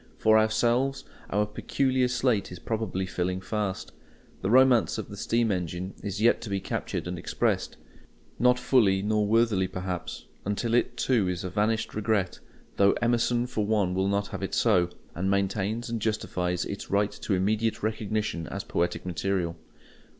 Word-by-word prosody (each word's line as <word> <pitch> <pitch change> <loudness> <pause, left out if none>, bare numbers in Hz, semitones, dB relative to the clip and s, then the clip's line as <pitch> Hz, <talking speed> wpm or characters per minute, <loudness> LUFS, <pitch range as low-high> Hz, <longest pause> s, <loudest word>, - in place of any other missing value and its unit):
For 110 0 +5
ourselves, 120 +5 +1 0.3
our 105 +1 +1
peculiar 130 +4 0
slate 125 -6 0
is 90 - -7
probably 105 -4 -2
filling 90 0 -2
fast. 100 0 -3 0.5
The 95 - -1
romance 125 -1 +5
of 110 - -5
the 100 - -8
steam 115 +2 +1
engine 90 0 -3
is 100 -1 -4
yet 115 +2 +4
to 110 - -6
be 100 -1 -1
captured - - -3
and 90 -1 -4
expressed—not 120 - -1
fully 115 -6 +3
nor 105 0 +1
worthily, 110 -4 +3
perhaps, 90 -2 -5 0.2
until 105 +3 -1
it 120 0 +1
too 115 -7 +2
is 90 -1 -2
a 95 - -4
vanished 110 +2 0
regret; 105 -3 0 0.4
though 100 0 +5
Emerson 120 0 +2
for 115 -4 -2
one 100 -4 +1
will 95 +1 +1
not 100 +1 0
have - - -6
it - - -2
so, 90 -1 +3 0.2
and 95 +2 -1
maintains 100 +4 0
and 115 -1 -3
justifies 90 -5 -1
its 100 - -6
right 100 +1 +2
to 100 - -2
immediate 110 +4 0
recognition 105 -6 -2
as - - -5
poetic 85 +1 -1
material. 90 -1 -1
105 Hz, 160 wpm, -27 LUFS, 95-115 Hz, 0.5 s, For